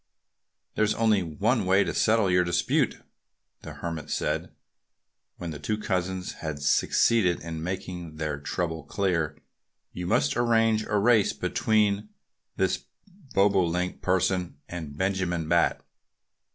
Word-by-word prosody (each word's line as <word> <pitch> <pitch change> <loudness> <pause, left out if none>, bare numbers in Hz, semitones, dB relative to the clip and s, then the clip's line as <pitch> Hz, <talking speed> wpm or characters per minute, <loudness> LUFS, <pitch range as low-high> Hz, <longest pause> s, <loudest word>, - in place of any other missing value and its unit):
"There's 110 0 +1
only 110 -3 +3
one 100 - 0
way 95 +2 +4
to - - -3
settle 110 -3 +3
your 90 0 +4
dispute," 85 0 0 0.6
the - - -8
Hermit 80 -3 -5
said - - -2 0.9
when 85 -2 -5
the 75 - -7
two 105 +8 -2
cousins 95 -3 -2
had 80 -2 -4
succeeded 90 +4 +3
in 80 -1 -6
making 90 -2 -5
their 75 -2 -3
trouble 80 +1 -3
clear. 80 -2 -1 0.6
"You 90 0 -5
must 70 -5 +2
arrange 115 -2 +2
a 105 - 0
race 110 0 +4
between 105 -1 +1 0.5
this - - 0 0.5
Bobolink 90 -3 +2
person 95 -1 0
and 80 -5 -7
Benjamin 90 -3 -1
Bat." 85 +1 +2
90 Hz, 125 wpm, -27 LUFS, 85-105 Hz, 0.9 s, way